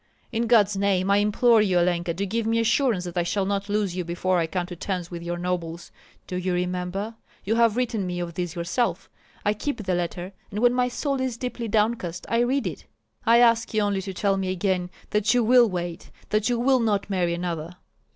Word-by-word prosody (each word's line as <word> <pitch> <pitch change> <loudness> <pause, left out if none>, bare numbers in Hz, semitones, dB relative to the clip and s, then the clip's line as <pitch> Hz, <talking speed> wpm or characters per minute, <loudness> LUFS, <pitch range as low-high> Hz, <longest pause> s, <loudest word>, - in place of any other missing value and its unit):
In 235 0 0
God's 210 -4 +4
name 195 -1 +1
I 200 - +5
implore 215 +2 +4
you, 190 -4 +2
Olenka, 175 -1 +1
to 200 +3 -1
give 225 +3 -2
me 225 0 +2
assurance 230 -3 +2
that 175 0 -3
I - - +3
shall 190 +3 0
not 200 +1 -2
lose 205 -3 0
you 180 - -2
before 175 +2 0
I 165 - 0
come 180 +1 -2
to 175 0 -8
terms 180 0 -4
with 170 -1 -6
your 175 0 -3
nobles. 175 -1 -4 0.3
Do 180 - -4
you 180 0 -1
remember? 180 +4 -2 0.3
You 210 - 0
have 230 -1 +3
written 230 -6 -1
me 180 0 -3
of 175 -1 -4
this 175 0 -4
yourself. 180 +8 -1 0.3
I 205 - +3
keep 215 +2 -4
the 185 -1 -1
letter, 175 +2 -3 0.2
and 205 - -4
when 245 +1 +4
my 250 0 +2
soul 275 +2 -2
is 255 -3 -2
deeply 245 -1 -4
downcast 210 -5 0
I 230 - +2
read 245 +1 +1
it. 170 -5 -5 0.4
I 235 +1 +6
ask 230 -1 +3
you 215 - +3
only 200 -1 0
to 195 - -5
tell 195 0 +1
me 190 -1 -2
again 185 -1 0 0.2
that 210 +3 +2
you 245 - +4
will 240 0 +6
wait, 175 -2 -5 0.2
that 215 +2 +1
you 240 - +1
will 260 +2 +3
not 210 -4 0
marry 175 -3 +1
another." 170 -1 -4
195 Hz, 220 wpm, -25 LUFS, 180-230 Hz, 0.4 s, I